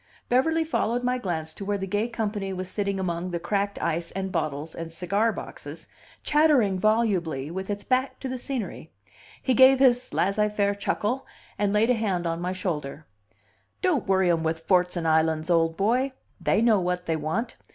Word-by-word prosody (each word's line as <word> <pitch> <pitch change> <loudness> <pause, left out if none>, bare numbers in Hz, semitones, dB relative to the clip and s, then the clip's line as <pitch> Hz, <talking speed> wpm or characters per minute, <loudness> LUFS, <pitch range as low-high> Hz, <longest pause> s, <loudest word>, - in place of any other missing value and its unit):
Beverly 320 +7 +3
followed 245 -6 -1
my 250 +1 0
glance 160 -7 -3
to 200 - -8
where 205 +1 -1
the 195 - -3
gay 205 +4 0
company 210 -4 -3
was 185 0 -4
sitting 200 -2 -1
among 175 -1 -2
the 175 -1 -3
cracked 200 +3 -1
ice, 170 +1 -1
and 190 0 -4
bottles, 155 -2 -2
and 165 0 -6
cigar 200 +7 +1
boxes, - - -8 0.4
chattering 285 -11 +3
volubly, 185 -10 +1
with 190 +2 -5
its 205 0 -3
back 260 +1 0
to 270 - -3
the 255 -1 -4
scenery. 235 - -5 0.5
He 260 - +2
gave 260 +2 +7
his 250 -2 +3
laisser 210 +3 +1
faire 205 -1 +1
chuckle, 210 +5 -2 0.3
and 205 -1 +2
laid 215 +4 +3
a - - +5
hand 200 -7 -1
on 165 0 -2
my 180 +1 -1
shoulder. 160 -5 -4 0.8
"Don't 340 - +1
worry 190 -2 +3
'em 165 -1 +1
with 160 0 -1
forts 180 +1 +2
and 165 -1 -1
islands, 160 +1 +2
old 165 -1 +2
boy! 250 +7 +1 0.3
They 225 - +2
know 225 -4 +5
what 180 0 -2
they 165 - 0
want. 160 +10 -3
195 Hz, 185 wpm, -26 LUFS, 170-230 Hz, 0.8 s, gave